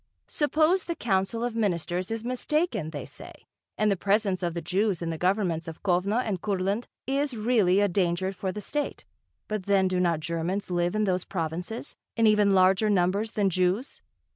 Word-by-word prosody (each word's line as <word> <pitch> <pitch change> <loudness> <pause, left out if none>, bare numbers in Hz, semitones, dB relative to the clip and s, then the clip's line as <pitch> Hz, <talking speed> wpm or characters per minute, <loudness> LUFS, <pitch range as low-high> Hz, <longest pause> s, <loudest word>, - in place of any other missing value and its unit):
Suppose 315 +5 +2
the 340 - -3
Council 210 0 0
of 240 -1 -2
Ministers 180 -4 -1
is 225 0 -3
mistaken, 255 - -1
they 145 -4 -6
say, - - -12 0.3
and 215 -1 +2
the - - +2
presence 195 0 +1
of 175 -2 -2
the - - -1
Jews 195 +1 0
in 170 -1 -3
the 160 - -4
governments 180 -3 0
of 165 -1 -8
Kovno 195 +3 +1
and 205 -8 -2
Kurland 200 +3 -1 0.2
is 275 -1 -1
really 210 -4 +3
a 205 - +4
danger 185 0 0
for 190 0 -3
the 210 - -6
State, 290 +7 -3 0.4
but 210 -3 -4
then 195 -2 +4
do 185 -1 0
not 170 -3 +2
Germans 170 +5 -3
live 175 +2 0
in 215 - +2
those 185 -3 0
provinces, 175 +5 -4 0.2
in 230 - +4
even 210 -2 +4
larger 190 +3 +4
numbers 200 +3 +1
than 200 -2 +1
Jews? 185 - 0
195 Hz, 185 wpm, -27 LUFS, 180-220 Hz, 0.4 s, a